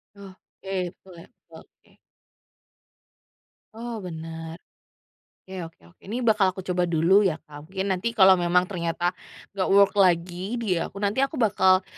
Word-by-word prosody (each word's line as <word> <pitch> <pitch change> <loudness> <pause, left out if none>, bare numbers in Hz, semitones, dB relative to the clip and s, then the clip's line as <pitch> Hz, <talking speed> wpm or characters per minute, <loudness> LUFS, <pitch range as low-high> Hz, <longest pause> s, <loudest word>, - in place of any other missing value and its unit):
Oke, 190 -1 -7
betul 190 - -18
ya, - - -14 0.2
oke. - - -18 1.8
Oh 235 +1 -6
bener. 165 0 -8 0.8
Ke 185 -3 -7
oke 165 - -19 0.2
oke, - - -34
ini 240 +4 -3
bakal 210 -4 +3
aku 190 - -7
coba 180 -1 0
dulu 170 +4 +4
ya 165 - -1
Kak, 150 0 -12
mungkin 190 +1 -3
nanti 230 +6 -2
kalau 190 -3 +6
memang 175 +1 +3
ternyata 175 -2 -2 0.4
nggak 195 -2 -2
work 200 0 +6
lagi 180 +3 +1
di 205 -8 -1
aku, - - -5
nanti 205 +5 0
aku 275 +3 0
bakal 190 -5 +3
185 Hz, 145 wpm, -25 LUFS, 175-200 Hz, 1.8 s, kalau